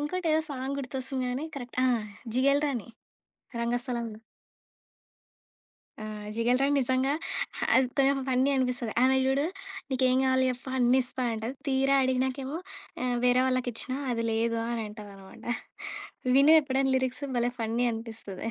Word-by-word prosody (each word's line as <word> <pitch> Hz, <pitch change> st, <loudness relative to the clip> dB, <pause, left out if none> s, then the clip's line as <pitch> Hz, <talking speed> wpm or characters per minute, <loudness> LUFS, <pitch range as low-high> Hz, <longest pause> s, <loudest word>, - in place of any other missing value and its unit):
ఇంకోటేదో 320 Hz, +1 st, +1 dB
song 270 Hz, +1 st, -3 dB
గుర్తొస్తుంది 260 Hz, 0 st, -3 dB
గానీ 265 Hz, +5 st, -2 dB
correct 245 Hz, -1 st, -7 dB
ఆ! -, -, +4 dB, 0.5 s
'జిగేల్ 280 Hz, +3 st, +4 dB
రాణి' 235 Hz, -4 st, -4 dB, 0.7 s
'రంగస్థలం' 240 Hz, 0 st, -1 dB
లో. 220 Hz, -, -14 dB, 1.8 s
ఆ! -, -, -5 dB, 0.3 s
'జిగేల్ 240 Hz, +2 st, +2 dB
రాణి' 285 Hz, +1 st, +3 dB
నిజంగా 260 Hz, +2 st, +1 dB, 0.6 s
అది 260 Hz, 0 st, +5 dB
కొంచెం 275 Hz, 0 st, +4 dB
ఫన్నీ 260 Hz, +2 st, +3 dB
అనిపిస్తది. 250 Hz, -3 st, 0 dB
ఆమె 265 Hz, +1 st, +5 dB
చూడు 275 Hz, +2 st, +2 dB, 0.5 s
నీకేం 255 Hz, 0 st, +3 dB
కావాలి 260 Hz, 0 st, +3 dB
జెప్పు 250 Hz, +1 st, -6 dB
అన్నిస్తా 255 Hz, +1 st, +2 dB
అంటది. 225 Hz, +4 st, -4 dB
తీరా 270 Hz, +1 st, +3 dB
అడిగినాకేమో, 260 Hz, +3 st, -1 dB, 0.5 s
ఆహ్, 245 Hz, -1 st, +1 dB
వేరే 250 Hz, +1 st, +5 dB
వాళ్ళకిచ్చినా 255 Hz, 0 st, -1 dB, 0.2 s
అది 230 Hz, 0 st, -1 dB
లేదు 230 Hz, +1 st, +1 dB
అని 230 Hz, -2 st, -2 dB
అంటదనమాట. 205 Hz, -2 st, -12 dB, 0.9 s
విను 285 Hz, +3 st, +7 dB
ఎప్పుడైనా 270 Hz, -1 st, +1 dB
లిరిక్సు 260 Hz, +2 st, -1 dB
భలే 240 Hz, +1 st, +1 dB
ఫన్నీ 230 Hz, +2 st, 0 dB
అనిపిస్తది. 225 Hz, -2 st, -6 dB
255 Hz, 130 wpm, -28 LUFS, 240-270 Hz, 1.8 s, విను